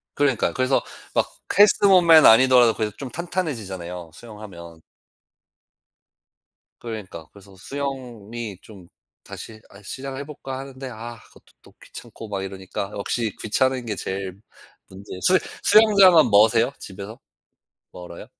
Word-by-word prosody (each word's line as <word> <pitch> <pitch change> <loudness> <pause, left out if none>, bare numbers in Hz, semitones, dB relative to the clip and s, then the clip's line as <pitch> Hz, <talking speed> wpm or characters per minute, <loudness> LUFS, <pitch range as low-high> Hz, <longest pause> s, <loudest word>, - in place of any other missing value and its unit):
그러니까요. 140 -6 +1
그래서 130 +1 +1 0.3
막 - - +1 0.3
헬스 205 0 +5
몸매는 170 -5 +7
아니더라도 125 0 +6
그래도 110 -1 -2
좀 135 - -7
탄탄해지잖아요 110 - -5
수영하면. 90 -6 -12 2.0
그러니까요. 105 -9 -8
그래서 100 -1 -17
수영이 120 -3 -6
좀 95 -5 -15 0.4
다시 110 -1 -10
아 100 - -16
시작을 135 +6 -7
해볼까 135 -2 -8
하는데 135 -1 -8
아 120 0 -9
그것도 - - -23
또 - - -20
귀찮고 115 - -11
막 100 -2 -4
이러니까 95 +1 -6
역시 110 +1 -3
귀찮은 130 +3 0
게 105 - -3
제일 95 0 -6 0.5
문제에요 95 0 -10
수 185 - +4 0.3
수영장은 195 - +6
머세요 110 +4 +4
집에서? 100 +5 -9 0.7
멀어요? 90 -1 -10
115 Hz, 315 characters per minute, -22 LUFS, 100-135 Hz, 2.0 s, 몸매는